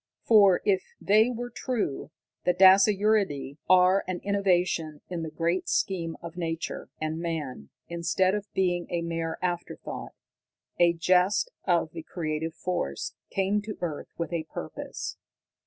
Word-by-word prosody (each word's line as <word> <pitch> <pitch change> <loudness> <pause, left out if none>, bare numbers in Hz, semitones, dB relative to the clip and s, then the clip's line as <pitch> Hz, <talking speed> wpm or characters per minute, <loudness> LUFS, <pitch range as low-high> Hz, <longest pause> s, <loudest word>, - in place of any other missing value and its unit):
For, 200 -5 +6
if 190 -2 +3 0.2
they 215 +4 +4
were 245 0 -5
true, 230 - -2 0.3
the 180 - +2
dasyuridae 195 -6 +4
are 185 +1 +5
an 185 -1 -2
innovation 180 -6 +1
in 175 -2 -3
the 160 - -4
great 170 +3 -1
scheme 170 -4 -1
of 170 -1 -7
nature, 165 -1 -4
and 155 +1 -2
man, 150 - -4 0.2
instead 170 +2 +1
of 205 0 -4
being 175 -2 0
a 170 -1 -1
mere 165 -1 -3
afterthought, 175 -1 -4 0.7
a 170 -1 +5
jest 180 - +2
of - - +2
the 330 - -7
Creative 160 - -3
Force, 160 - -3 0.2
came 195 +2 +1
to 215 0 -7
earth 160 -4 -4
with 170 +1 -3
a 165 -2 -2
purpose. 80 - -6
175 Hz, 140 wpm, -27 LUFS, 165-195 Hz, 0.7 s, For